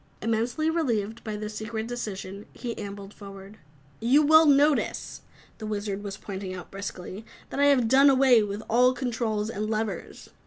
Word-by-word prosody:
Immensely 230 +7 -1
relieved 230 -9 -1
by 215 -2 -4
this 210 0 -5
secret 220 +1 -4
decision, 205 -4 -6
he 240 -2 -5
ambled 200 -1 -8
forward. 195 0 -12 0.4
"You 260 +7 +4
will 315 +1 +6
notice," 285 +1 +2 0.4
the 215 - -6
Wizard 205 -1 -3
was 195 -1 -6
pointing 190 -2 -6
out 180 -2 -10
briskly, 195 +1 -7 0.3
"that - - -4
I 285 - +5
have 270 -5 +4
done 275 +4 +6
away 260 -3 +5
with 205 +1 -4
all 250 +3 +4
controls 230 -4 -2
and 215 +1 -3
levers. 215 -4 -4
220 Hz, 160 wpm, -26 LUFS, 205-250 Hz, 0.4 s, will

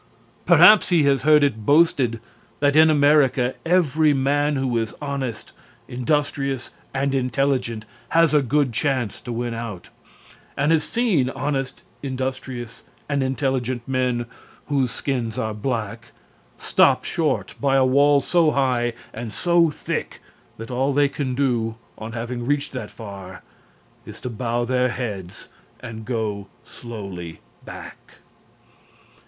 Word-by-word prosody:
Perhaps 210 -2 +7
he 170 -4 +4
has 140 -1 +3
heard 150 -1 +5
it 115 -6 0
boasted 140 -4 +3 0.4
that 145 0 +2
in 160 0 +7
America 145 -4 +3
every 160 -4 +3
man 145 +2 +1
who 130 -3 -1
is 115 -1 -2
honest, 135 -6 -4 0.4
industrious 135 0 -1 0.2
and 135 0 -1
intelligent 125 -3 0 0.2
has 165 -2 +3
a 150 - +5
good 135 0 +1
chance 125 -3 -1
to 120 - -7
win 120 0 -3
out, 115 -6 -6 0.7
and 145 +3 +2
has 160 -2 +3
seen 195 - +1
honest, 135 -1 -3 0.2
industrious 130 -3 -5 0.2
and 140 -1 0
intelligent 130 -2 -1
men 125 -2 0 0.4
whose 135 -3 +1
skins 120 -4 -3
are 110 -1 -2
black 115 0 -4 0.5
stopped - - +3
short - - -1
by 140 -1 +2
a 135 -1 +4
wall 140 +2 +4
so 170 0 +3
high 125 -4 +1 0.2
and 115 -2 -6
so 170 +4 +3
thick 150 - -4 0.4
that 115 +2 -8
all 135 +3 0
they 145 +1 +4
can 130 -3 -3
do, 120 -5 0 0.2
on 110 +1 -7
having 120 +1 -4
reached 145 0 0
that 125 -5 -6
far, 100 -4 -10 0.6
is - - -10
to 125 - -5
bow 120 +1 -2
their 125 +1 +1
heads 105 -8 -6 0.3
and 110 -3 -8
go 105 -5 -3 0.2
slowly 100 -8 -8 0.2
back. - - -11
130 Hz, 135 wpm, -22 LUFS, 115-145 Hz, 0.7 s, Perhaps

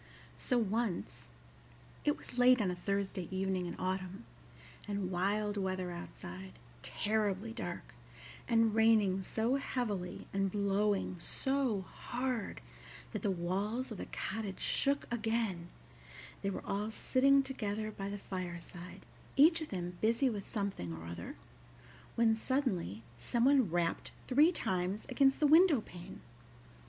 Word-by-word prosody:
So 250 - +1
once 215 - -1 0.7
it 295 - +2
was - - -11
late 250 0 +7
on 195 -4 +1
a - - -3
Thursday 195 -1 -2
evening 190 -1 -1
in - - -5
autumn, 185 +3 -3 0.6
and 200 -2 -2
wild 205 +3 0
weather 185 -2 -1
outside, 95 - -8 0.3
terribly 210 - -1
dark, 230 - -6 0.5
and 225 -2 +4
raining 215 -4 +4
so 225 +7 +1
heavily 210 -10 -3
and 195 -1 +1
blowing 200 -2 +1
so 265 0 0
hard 245 +4 -3 0.5
that - - -3
the 210 - +1
walls 195 +8 -1
of 215 - -6
the - - -5
cottage 205 -2 -4
shook 280 0 +1
again 220 -7 -1 0.7
they 195 - 0
were 195 - -5
all 205 +2 -1
sitting 275 +5 +4
together 215 -5 -3
by 195 -1 -5
the 205 - -4
fireside, 180 -2 -7 0.3
each 325 +4 +6
of 315 - -5
them 180 -2 -4
busy 230 +4 +3
with 205 -3 -6
something 200 - -3
or 80 - -9
other, 85 +1 -6 0.8
when 230 -1 +4
suddenly 220 - -1 0.2
some 235 - +1
one 265 -6 +5
rapped 170 0 0 0.2
three 295 +6 +6
times 190 - -1
against 270 +1 +4
the 305 - +4
window 315 -1 +7
pane. 175 -5 -10
205 Hz, 135 wpm, -34 LUFS, 185-240 Hz, 0.8 s, late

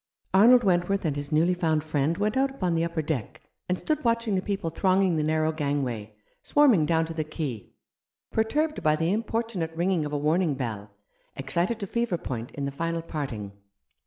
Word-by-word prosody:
Arnold 240 +6 +7
Wentworth 185 0 +1
and 150 -3 0
his 145 +1 -5
newly 165 +4 +3
found 160 -4 0
friend 155 +1 0
went 210 +1 0
out 270 +1 +2
upon 185 -11 -2
the 165 0 +1
upper 170 -1 -2
deck, 145 -7 -3 0.3
and 180 - +1
stood 305 - -2
watching 230 -2 +1
the 185 - +1
people 195 -5 -3
thronging 185 +1 +2
the 155 - +1
narrow 155 +1 +1
gangway, 135 -8 -2 0.3
swarm 290 -3 +4
ing 155 -7 +2
down 165 -1 +2
to 165 - -6
the 160 -1 -2
quay, 150 - -5 0.6
perturbed 300 +8 0
by 155 0 +3
the 165 +4 0
importunate 220 -6 -2
ringing 175 -1 +1
of 150 - -4
a 145 - -1
warning 155 +1 +1
bell, 110 -6 -4 0.5
excited 170 +11 -1
to 200 - -3
fever 235 -2 -1
point 120 -6 -5
in 140 - -3
the 140 - -2
final 165 +3 -2
parting. 135 -11 -5
165 Hz, 190 wpm, -26 LUFS, 150-195 Hz, 0.6 s, Arnold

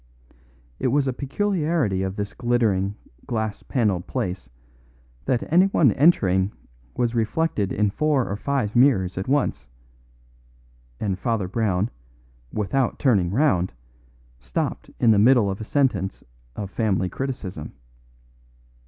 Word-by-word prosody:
It - - 0
was 140 +2 +2
a 130 - 0
peculiarity 150 - 0
of 95 0 -2
this 100 -1 -4
glittering, 110 -5 +1 0.3
glass 110 -3 -2
panelled 105 -9 0
place 90 -5 -3 0.8
that 120 - +1
anyone 175 - +5
entering 100 - +3 0.4
was 120 -1 0
reflected 115 - 0
in 105 -1 +1
four 150 0 +1
or 100 - -2
five 130 -2 -2
mirrors 120 -8 +4
at 95 - -4
once; 140 - 0 1.3
and 95 -3 -2
Father 115 -5 -1
Brown, 100 0 0 0.6
without 120 +5 0
turning 100 -10 +2
round, 95 - +1 0.7
stopped - - -3
in 115 - +5
the 105 - +4
middle 115 -2 +5
of 95 - -6
a - - -3
sentence 110 -7 0 0.3
of 100 -2 -5
family 100 -4 0
criticism. 100 - -5
110 Hz, 120 wpm, -23 LUFS, 95-135 Hz, 1.3 s, anyone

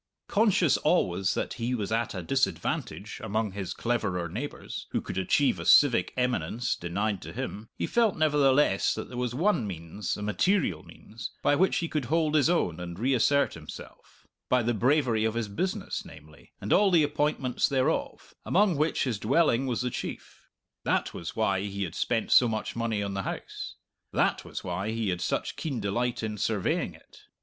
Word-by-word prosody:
Conscious 200 - +3
always 95 - +1
that - - -2
he 125 +2 0
was 105 -3 -3
at 115 -1 0
a 95 - -4
disadvantage 80 - -2
among 110 +1 -1
his 95 -1 -5
cleverer 95 -7 -1
neighbours, 115 - -6
who - - -1
could - - -6
achieve 140 +9 +2
a - - -4
civic 125 -10 +6
eminence 125 -1 0
denied 100 +3 -2
to - - -8
him, 110 -3 -6
he - - -1
felt 230 -4 +2
nevertheless 145 -7 +3
that 110 - -6
there 125 - -7
was 125 -1 -2
one 160 - +2
means, 85 +2 -4
a 105 - -5
material 105 - +1
means, 110 +2 -9
by 145 - +4
which 190 +6 +3
he 170 - -1
could 150 -5 -2
hold 155 +3 +1
his 155 0 +4
own 90 - +1
and 85 -1 -6
reassert 135 +4 +2
himself 80 -2 -12 0.2
by 125 -1 +3
the 120 +1 +1
bravery 120 -1 +2
of 110 0 0
his 115 -2 -1
business, 190 - -3
namely, 75 0 -15
and 100 - 0
all 205 0 +5
the 170 -4 +5
appointments 145 -3 0
thereof, 135 +3 -1
among 195 -1 +3
which 155 +2 +1
his 120 -7 -1
dwelling 135 +1 +2
was 125 -2 -1
the 125 - -1
chief. - - -7 0.4
That - - 0
was 85 -1 -6
why 100 -4 +1
he 100 0 -3
had 85 -4 -5
spent 115 +3 -1
so 125 - +7
much 110 -2 -3
money 115 -3 -1
on 100 -1 -3
the 100 - -2
house. - - -6 0.4
That - - +1
was - - -7
why 90 +4 -3
he 110 -2 -1
had 90 -1 -2
such - - -1
keen 140 -7 -3
delight 120 +4 -1
in 105 -1 -3
surveying 105 -2 0
it. - - -19
115 Hz, 185 wpm, -28 LUFS, 100-145 Hz, 0.4 s, so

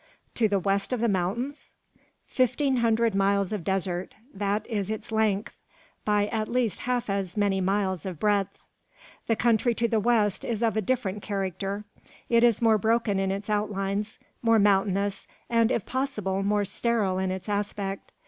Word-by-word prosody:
"To 225 - +2
the 200 - +2
west 195 +4 0
of 250 - -1
the 235 - +2
mountains?" 220 +9 -2 0.5
"Fifteen 260 +1 +1
hundred 230 -1 +2
miles 195 0 +1
of 205 -5 -3
desert; 185 -1 -2 0.2
that 205 +1 -1
is 205 -4 -2
its 220 +1 -4
length, 220 -1 0 0.5
by 210 -1 +3
at 215 -1 -1
least 240 -6 0
half 245 -1 -1
as 195 -2 -2
many 200 -2 +2
miles 190 -2 0
of 180 -5 -6
breadth. 200 -2 +1 0.7
The 225 - +2
country 235 +1 +2
to 235 - +1
the 225 -1 +1
west 215 -3 +2
is 235 -1 -2
of 225 -3 +2
a 220 - +1
different 210 -3 -1
character. 195 +1 -3 0.5
It 235 0 +4
is 235 -1 +3
more 220 -2 +5
broken 220 -1 +1
in 195 0 0
its 200 +1 -3
outlines, 205 0 -1 0.2
more 230 -1 +4
mountainous, 200 -1 +2 0.2
and 230 -1 +4
if 210 - 0
possible 210 -8 -2
more 205 +1 +1
sterile 200 -2 0
in 190 0 0
its 190 +1 -4
aspect. 200 -1 -3
205 Hz, 165 wpm, -27 LUFS, 195-230 Hz, 0.7 s, more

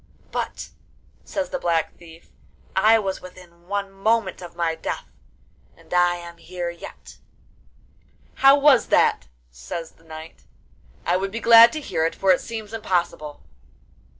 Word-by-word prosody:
'But,' - - -4 0.5
says 290 -1 -4
the 275 - -2
Black 165 -5 0
Thief, 165 -1 -16 0.4
'I 215 +4 +5
was 195 -3 -3
within 175 -1 -15
one 200 0 -3
moment 195 -1 0
of 175 -1 -10
my 170 -1 0
death, - - -5 0.7
and - - -13
I 175 0 +3
am 170 -1 -10
here 175 0 -5
yet.' 170 - -12 1.2
'How 275 +1 +7
was 280 -3 +5
that?' - - +2 0.2
says 65 - -7
the 165 - -27
knight; 160 0 -11 0.6
'I 175 +1 +2
would 195 +1 -3
be 230 - -4
glad 230 0 +8
to 310 - -3
hear 160 - -2
it, 165 - 0
for 195 - +3
it 185 - +3
seems 220 -2 -7
impossible. 175 -8 -2
180 Hz, 150 wpm, -23 LUFS, 170-220 Hz, 1.2 s, glad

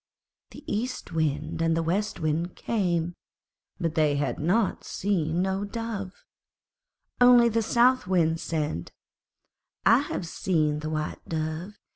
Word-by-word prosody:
The - - -12
East 240 -1 -3
Wind 155 -1 -1
and 165 0 +2
the 165 - +1
West 190 +5 -1
Wind 160 +2 -1
came, 175 -6 -1 0.7
but 165 -3 -1
they 155 -2 +2
had 145 0 -1 0.5
seen 175 -3 -1
no 190 +1 -1
Dove. 205 -3 -5 1.0
Only 245 -1 +7
the 230 0 +1
South 245 +1 +3
Wind 165 -3 +2
said, 150 - -3 0.9
'I - - +7
have 180 - -3
seen 155 -4 0
the 155 0 -4
White 155 -1 -3
Dove. 160 +5 -4
170 Hz, 125 wpm, -27 LUFS, 155-205 Hz, 1.0 s, Only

